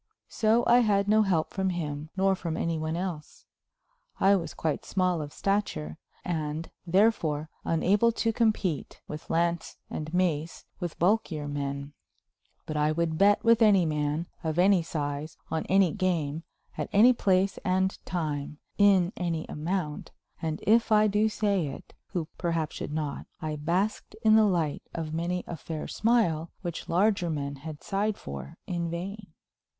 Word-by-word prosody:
So 225 +2 +2
I 240 - +6
had 205 -4 +2
no 215 +1 +5
help 180 -6 +1
from 190 -1 0
him 155 -4 -4
nor 195 0 +3
from 165 -3 -4
any 165 -2 -1
one 155 +1 -2
else. 175 -5 -5 0.7
I 195 +1 +5
was 170 -4 -3
quite 155 -2 -2
small 180 -3 0
of 145 -1 -6
stature 140 - -2 0.3
and, 155 -1 -3 0.2
therefore, 165 -6 +2
unable 200 +8 +3
to 225 0 0
compete, 215 - 0
with 150 +1 -8
lance 170 0 0
and 155 0 -4
mace, 170 -3 -1
with 175 -3 -4
bulkier 175 -5 +1
men; 140 0 -4 0.7
but 155 - -5
I 150 0 +2
would 160 0 -1
bet 205 +1 +5
with 230 0 +5
any 200 -5 +6
man, 150 +1 -1 0.2
of 160 0 -2
any 185 0 +5
size, 150 -1 -4
on 160 - -2
any 190 -3 +4
game, 165 -6 -1 0.3
at - - -2
any 235 +5 +7
place 195 -3 +1
and 190 +1 +1
time, 150 -4 -3 0.2
in 195 -3 +5
any 170 -3 -2
amount; 155 0 -3 0.3
and, 160 -1 -3
if 225 +2 +4
I 215 0 +6
do 210 +1 +2
say 200 -6 0
it, 135 - -9
who 170 -4 -3
perhaps 165 -3 -1
should - - -5
not, 150 -2 -3
I 155 -3 -3
basked 175 +8 -1
in 220 -1 +6
the 220 -1 +6
light 170 -7 0
of 160 -2 -4
many 175 +2 -1
a 170 - -5
fair 160 0 -6
smile 190 -9 +1
which 175 -2 -5
larger 185 0 +2
men 140 -2 -3
had 150 +1 -8
sighed 205 +1 -1
for 70 0 -8
in 170 -2 -2
vain. 190 +4 -5
170 Hz, 160 wpm, -28 LUFS, 155-200 Hz, 0.7 s, any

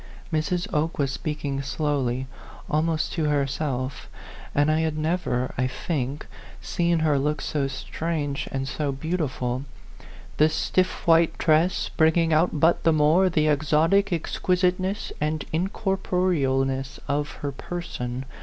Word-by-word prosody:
Mrs. 170 +3 0
Oke 155 +2 0
was 140 -2 +1
speaking 145 -2 -3
slowly, 135 -3 -1 0.4
almost 155 +1 0
to 160 - 0
herself, 140 -2 -1 0.5
and 145 +2 +3
I 155 - +2
had 160 -1 0
never, 155 -6 -1
I 130 - +2
think, 140 +1 -3 0.3
seen 170 -1 0
her 150 -3 +3
look 150 +2 0
so 140 -3 -1
strange 145 +1 -3
and 135 -1 -2
so 145 +1 -2
beautiful, 135 -4 -2 0.7
the 155 +1 +5
stiff 185 +3 0
white 165 0 +4
dress 165 +3 +2
bringing 160 0 +3
out 155 0 +2
but 165 +3 +4
the 165 - +4
more 155 +5 +4
the 155 -3 +2
exotic 155 +6 +3
exquisiteuess 180 +3 0
and 155 0 -1
incorporealness 160 - 0
of 145 +1 0
her 140 - -1
person. 130 -5 -5
155 Hz, 125 wpm, -25 LUFS, 140-170 Hz, 0.7 s, the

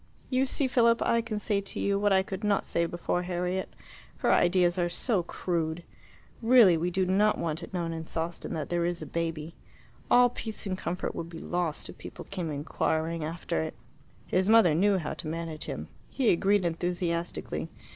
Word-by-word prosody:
You 260 +1 +2
see, 275 - +1
Philip, 235 -2 +4
I 230 - +2
can 220 -2 -4
say 205 -2 0
to 200 - -5
you 200 0 +1
what 205 0 +2
I 190 0 +4
could 190 +1 -6
not 205 -1 +1
say 170 0 0
before 175 +1 -1
Harriet. 180 +1 -2 0.5
Her - - +2
ideas 175 0 +3
are 175 0 +1
so 190 +3 0
crude. 170 -1 -2 0.6
Really 230 -6 +7
we 165 +2 0
do 190 +1 +1
not 205 +3 +3
want 160 0 -2
it 170 - -9
known 170 -3 -2
in 160 0 -5
Sawston 165 +1 -3
that 155 - -4
there 175 -1 +1
is 170 -1 -1
a - - -6
baby. 165 0 -3 0.6
All 245 0 +6
peace 220 -3 -6
and 190 -2 -1
comfort 180 -1 -3
would 165 - -5
be 170 - -9
lost 175 -2 -2
if - - -11
people - - -9
came 180 -4 -4
inquiring 160 +2 -1
after 160 - -2
it." 80 - -4 0.5
His 190 +2 +1
mother 220 -8 +6
knew 195 +5 +3
how 160 -5 -3
to - - -7
manage 160 -1 -4
him. - - -5 0.2
He 255 -5 +2
agreed 195 +2 +2
enthusiastically. 170 0 -2
175 Hz, 190 wpm, -28 LUFS, 165-200 Hz, 0.6 s, Really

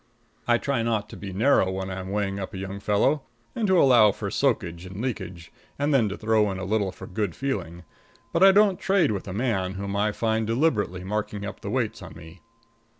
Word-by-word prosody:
I 120 0 +4
try 135 -1 -1
not 110 -2 -1
to - - -9
be 100 -2 -7
narrow 100 -1 +3
when 95 0 -4
I'm 95 0 -5
weighing 100 -1 -1
up 95 +1 -6
a - - -5
young 95 +1 -5
fellow, 105 +9 +2 0.3
and 225 -3 0
to 190 -2 +4
allow 120 -7 +6
for 100 0 -5
soakage 90 -11 0
and 95 +2 -9
leakage, 95 -8 -5 0.3
and 145 +1 0
then 115 -6 +3
to 100 - -5
throw 110 -1 +2
in 95 - -4
a 95 - -4
little 100 -1 0
for - - -10
good 100 -3 -3
feeling; 90 -11 -4 0.5
but 165 - +1
I 195 0 +9
don't 200 -1 +4
trade 190 - +2
with 100 -2 -4
a - - -4
man 100 -5 -1
whom 100 +1 -4
I 105 +1 +1
find 110 0 -1
deliberately 115 - 0
marking 105 +1 -3
up 105 0 -7
the 100 - -5
weights 120 -1 -1
on - - -10
me. 80 +2 -13
105 Hz, 215 wpm, -25 LUFS, 95-125 Hz, 0.5 s, I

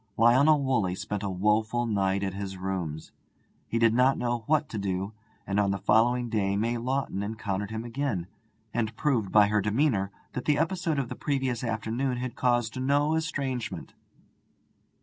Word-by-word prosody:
Lionel 140 +6 +5
Woolley 110 -9 +1
spent 105 +1 -4
a 100 - -2
woeful 110 +5 +1
night 100 -3 0
at 95 -2 -2
his 95 -1 -5
rooms. 90 -5 -4 0.6
He 115 - -1
did 115 -1 +4
not 130 +3 +4
know 120 -1 -1
what 155 -1 +2
to 110 - -4
do, 95 +1 -2 0.3
and 100 +1 0
on 100 -1 +2
the 100 - 0
following 120 +5 +3
day 100 -3 0
May 115 +3 0
Lawton 130 -4 -2
encountered 100 -2 -3
him 110 +1 -4
again, 120 -7 -2 0.5
and 115 -1 -1
proved 120 -10 0
by 105 -1 +7
her 105 0 +2
demeanour 105 -1 +1 0.2
that 125 - -4
the 150 -1 +3
episode 165 -1 0
of 135 -4 -1
the - - -5
previous 135 -4 -1
afternoon 115 +3 -1
had 125 -1 -4
caused 120 -1 0
no 145 +3 +2
estrangement. 140 -6 -3
115 Hz, 170 wpm, -28 LUFS, 100-130 Hz, 0.6 s, by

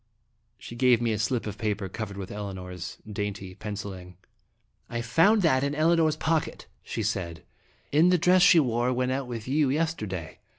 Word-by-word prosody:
She 120 - -10
gave 125 -1 +4
me 120 -1 0
a 105 - -1
slip 115 +2 -1
of 105 - -6
paper 105 -3 -2
covered 100 +1 -6
with 95 -2 -6
Elinor's 95 -3 -6
dainty 100 -2 -4
penciling. 95 -3 -7 0.4
" - - -47 0.3
I 120 0 -3
found 175 - +4
that 130 -5 +3
in 140 +1 -1
Elinor's 160 0 +3
pocket," 160 0 -1 0.2
she 110 - -4
said, 90 -6 -3 0.5
"in 160 +5 +5
the 180 - +4
dress 180 +2 +4
she 180 -2 +7
wore 120 -3 +1
when 125 0 0
out 135 0 -2
with 115 -2 -6
you 145 +1 +2
yesterday. 120 - -3
120 Hz, 175 wpm, -27 LUFS, 100-150 Hz, 0.5 s, she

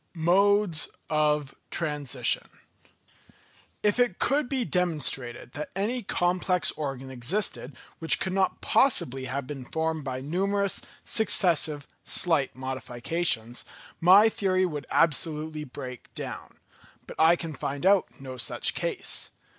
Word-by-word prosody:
Modes 190 +1 +3 0.2
of 150 -2 +1 0.2
Transition. 150 -6 -1 1.3
If 210 +3 +2
it 245 -7 +2
could 275 0 0
be 260 -3 -1
demonstrated 150 - -2
that 150 - -5
any 225 +6 -1
complex 180 -2 +1
organ 135 -3 -5
existed, 130 - -1 0.2
which 165 - +6
could 190 - -3
not 190 -1 0
possibly 135 - +2
have 135 +1 -4
been 135 -1 -7
formed 160 +3 -2
by 130 -1 -4
numerous, 195 +7 -1 0.2
successive, 165 -9 +2 0.2
slight 160 -6 +1
modifications, 130 -1 -2 0.4
my 190 +6 +7
theory 185 -4 +1
would 150 -6 -5
absolutely 155 -1 +1
break 125 -2 -9
down. - - -7 0.5
But - - -11
I 160 +2 +6
can 165 -2 -6
find 140 +2 -4
out 195 0 +4
no 130 -1 -8
such 120 - +1
case. - - -1
160 Hz, 120 wpm, -27 LUFS, 135-190 Hz, 1.3 s, my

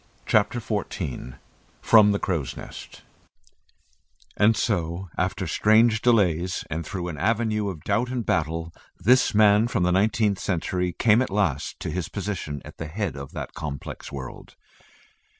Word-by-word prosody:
CHAPTER 110 +3 +2
XIV 90 - -4 0.4
FROM 105 -2 +6
THE 100 - +1
CROW'S 80 -11 -2
NEST - - -10 1.3
And 110 +2 +4
so 90 -3 -1
after - - -1
strange 110 +1 +3
delays 90 -7 +2
and 80 +2 -2
through 90 +2 -5
an 80 -5 -6
avenue 105 +1 0
of 80 -6 -8
doubt 120 +2 0
and 125 -3 -3
battle, 80 0 -1 0.2
this 120 +4 +3
man 105 +1 +5
from 115 -6 0
the 90 - +2
nineteenth 105 +1 +2
century 90 0 -1
came 110 +4 +3
at 130 - -1
last 95 -9 -1
to - - -3
his 90 +1 -3
position 95 -8 -4
at - - -12
the 80 - -5
head 95 0 -3
of 70 -1 -8
that - - -6
complex 70 -3 -6
world. 65 -3 -8
95 Hz, 150 wpm, -25 LUFS, 80-110 Hz, 1.3 s, FROM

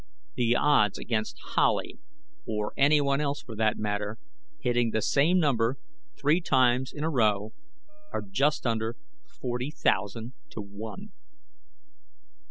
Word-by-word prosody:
The 120 0 +2
odds 120 -8 +3
against 110 -2 -2 0.2
Howley - - +1 0.5
or 105 -1 -2
anyone 140 0 +3
else, 145 -1 -2
for 115 - -9
that 110 -1 +2
matter 105 +1 -2 0.4
hitting 120 -3 +1
the 110 0 0
same 160 +6 +3
number 135 -6 +2 0.4
three 150 +5 +2
times 130 -3 +3
in 150 - -6
a 160 - +1
row 110 -5 +1 0.6
are - - -3
just 135 +11 0
under 115 0 0 0.3
forty 125 +1 -4
thousand 110 -3 -1 0.2
to 110 - -5
one. 110 - -8
120 Hz, 125 wpm, -28 LUFS, 110-140 Hz, 0.6 s, odds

